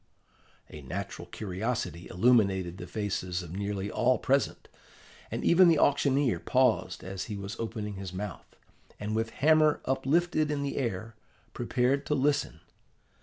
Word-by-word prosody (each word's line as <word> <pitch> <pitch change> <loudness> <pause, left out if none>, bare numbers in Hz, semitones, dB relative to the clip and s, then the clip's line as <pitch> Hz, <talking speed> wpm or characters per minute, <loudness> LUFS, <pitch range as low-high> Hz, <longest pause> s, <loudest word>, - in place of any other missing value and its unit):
A 75 - -9
natural 90 +4 -6
curiosity 95 -1 -3
illuminated 95 -4 +2
the - - -7
faces 95 -4 -3
of 85 -1 -9
nearly 100 0 -3
all 125 +1 +2
present; 135 +1 0 0.6
and - - -4
even 180 +1 +6
the 165 -2 +5
auctioneer 140 -3 +2
paused 125 -8 +1
as 95 0 -5
he 105 - -5
was 100 +1 -6
opening 110 -3 -4
his 95 -2 -6
mouth, 100 +1 -7 0.4
and 105 +1 -3
with 115 0 0
hammer 155 +3 +4
uplifted 155 +4 +1
in 145 -1 -1
the 140 - -3
air, 115 -3 -3 0.4
prepared 125 +3 0
to 150 - +1
listen. 145 - 0
110 Hz, 140 wpm, -29 LUFS, 95-135 Hz, 0.6 s, even